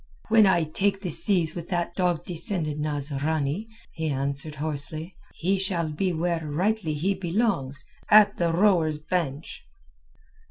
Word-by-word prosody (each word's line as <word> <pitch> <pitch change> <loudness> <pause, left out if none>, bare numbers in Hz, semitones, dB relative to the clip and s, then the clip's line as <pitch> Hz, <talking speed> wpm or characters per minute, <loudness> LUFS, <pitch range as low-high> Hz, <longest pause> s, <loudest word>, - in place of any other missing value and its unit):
"When 220 -2 +6
I 175 -3 +3
take 195 +5 0
the 180 -4 -3
seas 170 -1 +1
with 170 -1 -7
that 175 -2 -1
dog 180 -3 0
descended 165 -3 -2
Nasrani," 150 +4 -2 0.2
he 160 -1 -3
answered 140 +2 -2
hoarsely, 155 +3 -2 0.2
"he 190 +3 0
shall 180 -4 0
be 180 +5 -1
where 170 0 -1
rightly 170 +2 -1
he 180 +7 0
belongs—at 190 - +2
the 170 -1 +1
rowers' 170 -4 +3
bench." 155 -2 -3
165 Hz, 130 wpm, -26 LUFS, 150-190 Hz, 0.2 s, When